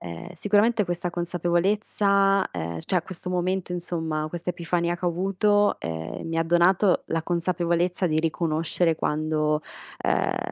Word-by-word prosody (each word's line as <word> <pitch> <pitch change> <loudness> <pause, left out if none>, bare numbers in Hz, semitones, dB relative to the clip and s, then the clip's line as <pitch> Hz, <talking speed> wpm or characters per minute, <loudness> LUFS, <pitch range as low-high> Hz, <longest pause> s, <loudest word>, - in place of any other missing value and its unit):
Ehm, 85 - -7
sicuramente 210 +4 +2
questa 175 0 -2
consapevolezza, 195 +3 +1
ehm, 85 -1 -4
cioè 185 - +1
a - - -24
questo 180 0 -8
momento 180 0 -1
insomma, 160 -3 -2
quest'epifania 170 0 -2
che 180 - -7
ho - - +4
avuto, 195 +4 +2
ehm, 80 0 -5
mi 165 - -2
ha 165 - +2
donato 175 +3 +3
la 165 0 -2
consapevolezza 175 +1 0
di 155 -2 +1
riconoscere 165 +1 0
quando, 155 0 0 0.4
ehm, - - +1
175 Hz, 135 wpm, -25 LUFS, 160-185 Hz, 0.4 s, ho